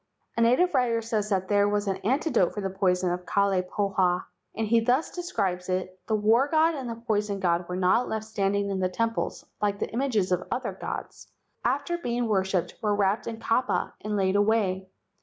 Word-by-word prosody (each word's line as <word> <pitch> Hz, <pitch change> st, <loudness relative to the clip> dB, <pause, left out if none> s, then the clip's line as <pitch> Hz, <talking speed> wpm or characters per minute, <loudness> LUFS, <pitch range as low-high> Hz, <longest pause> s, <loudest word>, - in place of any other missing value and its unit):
A 230 Hz, -, 0 dB
native 255 Hz, +11 st, +4 dB
writer 235 Hz, -2 st, +2 dB
says 220 Hz, -2 st, -2 dB, 0.2 s
there 205 Hz, 0 st, +3 dB
was 205 Hz, 0 st, 0 dB
an 190 Hz, -1 st, 0 dB
antidote 245 Hz, -, +1 dB
for 205 Hz, -, -3 dB
the 195 Hz, -1 st, -2 dB
poison 180 Hz, -2 st, +1 dB
from 180 Hz, -, -10 dB
Kalai 200 Hz, -1 st, +2 dB
pahoa, 185 Hz, -1 st, 0 dB, 0.3 s
and 225 Hz, -, -1 dB
he 230 Hz, +2 st, +4 dB
thus 250 Hz, +7 st, +1 dB
de¬ 355 Hz, -, -3 dB
scribes 190 Hz, -, -2 dB
it: 185 Hz, 0 st, -2 dB
"The 220 Hz, -, +1 dB
war 220 Hz, +6 st, +3 dB
god 320 Hz, +2 st, +3 dB
and 265 Hz, -5 st, -5 dB
the 230 Hz, -, -4 dB
poison 210 Hz, -3 st, -1 dB
god 175 Hz, -1 st, 0 dB
were 180 Hz, -, -2 dB
not 185 Hz, +6 st, +2 dB
left 220 Hz, 0 st, -3 dB
standing 200 Hz, -2 st, 0 dB
in 190 Hz, -, -1 dB
the 185 Hz, -1 st, +1 dB
temples 230 Hz, +4 st, -2 dB, 0.2 s
like 205 Hz, -1 st, +1 dB
the -, -, -3 dB
images 225 Hz, -7 st, 0 dB
of 180 Hz, 0 st, 0 dB
other 255 Hz, -, -2 dB
gods, -, -, -6 dB, 0.4 s
but -, -, +3 dB
after 345 Hz, -1 st, -1 dB
being 240 Hz, -5 st, -1 dB
worshipped 190 Hz, -4 st, 0 dB
were 210 Hz, -1 st, +1 dB
wrapped 205 Hz, +2 st, +1 dB
in 225 Hz, -1 st, -5 dB
kapa 230 Hz, +3 st, 0 dB
and 210 Hz, 0 st, -1 dB
laid 190 Hz, 0 st, +1 dB
away. 205 Hz, -3 st, +1 dB
205 Hz, 200 wpm, -27 LUFS, 190-230 Hz, 0.4 s, native